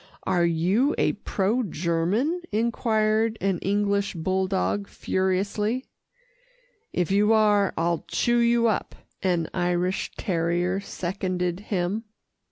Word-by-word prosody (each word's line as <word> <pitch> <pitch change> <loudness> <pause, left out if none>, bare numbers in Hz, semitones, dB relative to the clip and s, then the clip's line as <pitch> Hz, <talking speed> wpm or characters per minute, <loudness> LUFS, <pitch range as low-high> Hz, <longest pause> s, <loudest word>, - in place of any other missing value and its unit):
"Are 175 -2 +2
you 185 - +2
a - - +3
pro 210 +6 -1
German?" 190 - 0
enquired 220 0 +1
an 195 -3 0
English 200 0 0
bulldog 190 +3 0
furiously. 200 +7 -1 1.1
"If 180 0 -1
you 210 +3 +4
are, 210 -2 +4
I'll 170 0 0
chew 240 0 +1
you 235 0 +3
up," 220 -4 0 0.3
an 175 -4 +1
Irish 180 +1 0
terrier 175 +1 0
seconded 180 -2 -3
him. 200 +1 -2
195 Hz, 105 wpm, -25 LUFS, 180-215 Hz, 1.1 s, you